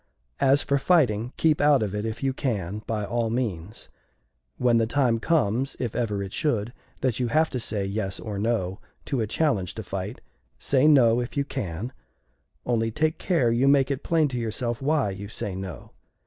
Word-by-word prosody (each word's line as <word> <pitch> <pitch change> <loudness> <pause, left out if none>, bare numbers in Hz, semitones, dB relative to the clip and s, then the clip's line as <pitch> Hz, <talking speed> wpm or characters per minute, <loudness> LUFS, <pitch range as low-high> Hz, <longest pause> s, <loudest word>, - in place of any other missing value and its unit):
"As 140 +1 +4
for 140 0 +1
fighting, 125 - +2
keep 155 -2 +3
out 145 -5 +5
of 105 -2 -3
it, 105 +1 -2
if 110 +4 -5
you 135 -1 +1
can, 105 -7 -2
by 105 -2 -1
all 115 +1 -1
means. 110 -6 -3 0.7
When 120 -2 +3
the 115 - +1
time 120 -2 +2
comes, 130 -3 +1
if 120 -4 -3
ever 105 -5 -1
it 95 - -7
should, 120 -6 -1 0.3
that 130 -3 0
you 125 - +1
have 155 +6 +2
to 125 - -2
say 105 -3 -2
'Yes' 100 -1 -3
or 105 -3 -5
'No' 100 -4 -1 0.3
to 135 -4 -1
a 110 - -1
challenge 110 - 0
to 110 - -5
fight, 95 +4 -5 0.4
say 140 +1 +2
'No' 125 -6 +5
if 120 +3 -5
you 140 - +1
can 105 - -4 0.7
only 115 -2 +1
take 155 +7 0
care 145 -11 +2
you 120 +4 +2
make 140 -1 +4
it 135 - -2
plain 160 -2 +2
to 125 -2 -3
yourself 120 +1 -2
why 140 -6 +1
you 100 +1 -7
say 105 -2 -4
'No.' 95 -7 -7
115 Hz, 190 wpm, -25 LUFS, 105-135 Hz, 0.7 s, out